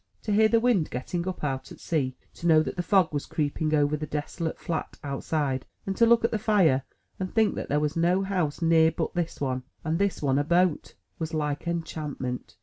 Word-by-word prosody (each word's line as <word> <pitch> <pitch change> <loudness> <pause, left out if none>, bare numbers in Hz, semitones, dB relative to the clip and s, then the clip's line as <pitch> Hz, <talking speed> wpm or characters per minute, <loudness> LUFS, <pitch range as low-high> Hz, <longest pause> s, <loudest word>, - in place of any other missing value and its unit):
To 215 - -2
hear 220 +1 +6
the 230 +1 +3
wind 225 -9 +2
getting 170 +8 -3
up 185 -4 -4
out 135 -2 -3
at - - -11
sea, 135 -6 -1 0.2
to 170 - -4
know 155 -2 +6
that - - -4
the 180 - -1
fog 180 -2 +3
was 145 - -2
creeping 155 +1 0
over 145 0 +2
the 150 0 -4
desolate 150 +3 -3
flat 165 -2 -4
outside, 140 -1 -1 0.2
and 195 - -2
to 230 - +4
look 235 0 +5
at - - +1
the 220 - 0
fire, 185 -11 +3 0.4
and 185 -1 -3
think 220 -3 +3
that - - -5
there 145 - +2
was 150 0 -1
no 175 +3 +2
house 180 -5 -1
near 165 -1 +5
but 160 0 -3
this 170 -2 -2
one, 130 -2 -1 0.2
and 165 +1 -1
this 200 -1 +1
one 140 -1 +1
a - - +2
boat, 175 +1 +1 0.2
was 160 0 -3
like 150 +1 -2
enchantment. 155 -6 -4
160 Hz, 220 wpm, -27 LUFS, 145-185 Hz, 0.4 s, hear